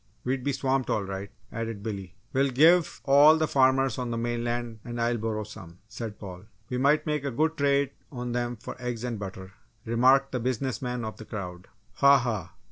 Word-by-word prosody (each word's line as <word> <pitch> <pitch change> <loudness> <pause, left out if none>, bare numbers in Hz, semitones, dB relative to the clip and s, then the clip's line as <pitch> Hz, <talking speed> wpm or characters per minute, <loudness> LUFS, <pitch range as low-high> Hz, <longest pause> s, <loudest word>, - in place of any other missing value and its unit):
We'd 130 0 -1
be 140 - +1
swamped 135 -1 0
all 105 - +1
right!" 95 +1 -5 0.2
added 115 -3 -4
Billy. 100 -3 -5 0.2
"We'll 135 +1 +3
give 160 +6 +4
all 145 +3 +7
the 155 0 +1
farmers 130 -2 +3
on 125 -1 -2
the 115 - -2
mainland 120 -1 -2
and 120 0 -6
Islesboro 115 -2 -1
some," 85 -5 -11
said 110 -1 -6
Paul. 95 -1 -9 0.3
"We 125 - -1
might 145 +3 +3
make 150 -3 -1
a 140 - -1
good 155 +6 0
trade 140 -2 +2 0.2
on 125 -2 -4
them 120 0 -1
for 110 - -8
eggs 120 -2 -3
and 120 -3 -3
butter!" 95 -1 -7 0.3
remarked 130 +4 +4
the 125 - -1
business 130 +1 -2
man 125 -2 -3
of 110 - -6
the 110 - -10
crowd. 90 -4 -7 0.3
"Ha, 140 0 +7
ha! 110 -9 -3
120 Hz, 195 wpm, -27 LUFS, 110-135 Hz, 0.3 s, all